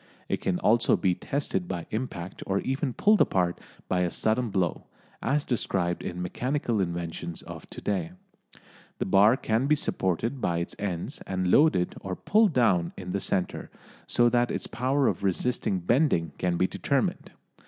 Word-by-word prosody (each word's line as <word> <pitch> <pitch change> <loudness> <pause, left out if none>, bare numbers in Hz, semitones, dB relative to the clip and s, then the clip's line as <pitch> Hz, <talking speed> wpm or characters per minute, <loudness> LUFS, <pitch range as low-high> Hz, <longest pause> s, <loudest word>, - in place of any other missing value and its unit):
It - - -2
can 90 -2 0
also 115 +5 +3
be 95 -3 +2
tested 95 -5 -2
by 90 -3 -4
impact 105 -6 -4
or 95 - +1
even 135 +1 -1
pulled 210 - +4
apart 90 -2 +2 0.3
by 90 - +1
a 90 -1 +1
sudden 110 +5 0
blow, 95 -4 -1 0.3
as 145 +1 0
described 95 -7 -1
in 90 0 -4
Mechanical 120 +3 -1
Inventions 85 -1 -4
of - - -10
To - - -8
day. 90 -4 -2 0.8
The - - -2
bar 105 +6 +5
can 115 +3 0
be 150 - +4
supported 115 - -1
by 85 -1 0
its 85 +1 -4
ends 100 - -4
and 95 -1 0
loaded 145 - +4
or 95 -1 -4
pulled 210 - +3
down 95 -10 +2
in 90 -1 -6
the 100 - 0
centre, 95 -1 -2 0.4
so 120 - +4
that 120 0 +2
its - - -3
power 130 +2 +1
of - - -1
resisting 100 +1 0
bending 90 - +2
can 90 -1 0
be 90 - +3
determined. - - -1
100 Hz, 165 wpm, -27 LUFS, 90-125 Hz, 0.8 s, bar